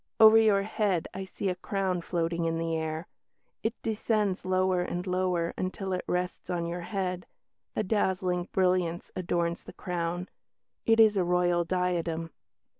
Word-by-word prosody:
Over 220 0 +9
your 210 -3 +4
head 200 -5 0
I 190 0 -5
see 190 +1 -4
a - - +1
crown 185 -1 -1
floating 170 -1 -1
in 165 0 0
the 165 0 -1
air. 160 +1 -3 0.6
It 225 - -2
descends 215 -3 0
lower 185 0 +2
and 175 0 -3
lower 180 -2 0
until 190 +1 -2
it 180 - -2
rests 180 +1 -2
on 175 -2 -1
your 170 +1 -3
head. 180 -1 -3 0.5
A - - +1
dazzling 185 -3 0
brilliance 180 -2 +1
adorns 170 -1 -1
the - - -11
crown; 175 0 -3 0.6
it 225 0 +5
is 215 -2 +6
a 185 - +3
Royal 175 0 +2
diadem." 170 -2 -1
180 Hz, 155 wpm, -29 LUFS, 170-190 Hz, 0.6 s, Over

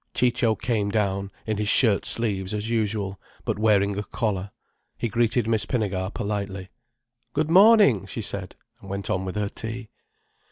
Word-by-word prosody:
Ciccio 120 -2 +2
came 110 -4 -1
down, 100 -2 -1
in 110 -2 -1
his 105 0 -1
shirt 110 -6 +3
sleeves 100 -4 0
as 105 +2 -3
usual, 105 -3 -1 0.2
but - - -2
wearing 100 -2 +2
a - - -3
collar. 100 -3 -2 0.5
He 120 - -2
greeted 115 +1 +1
Miss 110 -2 +1
Pinnegar 100 -6 -1
politely. 100 -3 -4 0.6
"Good 155 +2 0
morning!" 195 - +6
she 110 +3 -5
said, 100 -2 -4 0.3
and 100 - -12
went 100 0 -3
on 95 0 -1
with 95 - -5
her 105 -1 -1
tea. 110 +1 -6
105 Hz, 160 wpm, -25 LUFS, 100-115 Hz, 0.6 s, morning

